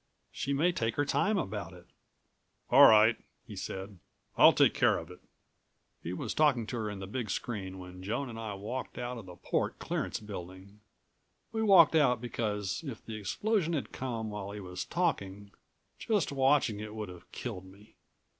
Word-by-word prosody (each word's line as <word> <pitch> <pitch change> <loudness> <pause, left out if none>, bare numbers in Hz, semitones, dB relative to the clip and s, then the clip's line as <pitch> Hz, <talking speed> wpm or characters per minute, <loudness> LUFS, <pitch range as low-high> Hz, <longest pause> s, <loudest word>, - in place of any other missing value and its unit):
She 135 - -3
may 155 +6 +3
take 115 -9 -1
her 145 - +1
time 205 +8 +1
about 105 - -4
it." 90 0 -14 0.9
"All - - +10
right," 110 +1 +6 0.3
he - - -9
said. 95 0 -6 0.4
"I'll - - +8
take - - +4
care - - +3
of 85 +2 -8
it." 90 - -12 0.8
He 85 - -5
was 90 - -3
talking 140 -7 +3
to 120 - -4
her 110 -2 -2
in 105 - -6
the 95 - -6
big 110 +2 -4
screen 95 -2 -4
when 90 0 -10
Joan 110 +9 -2
and 115 -2 -7
I 110 -3 -4
walked 115 +6 -5
out 125 0 -4
of 100 - -11
the 90 - -10
port - - -2
clearance - - -3
building. 100 0 -9 0.7
We 220 - -2
walked 190 -8 +7
out 135 -7 +4
because, 105 - -3
if 135 -8 -7
the 110 - -7
explosion 170 - 0
had 145 - -2
come 115 -4 -4
while 105 -1 -5
he 105 - -6
was 90 -1 -6
talking, 100 - -2 0.5
just 205 -10 0
watching 135 -5 +2
it 105 0 -7
would 105 -3 -5
have 90 -1 -13
killed 100 -7 -6
me. 100 +3 -17
110 Hz, 185 wpm, -31 LUFS, 95-135 Hz, 0.9 s, All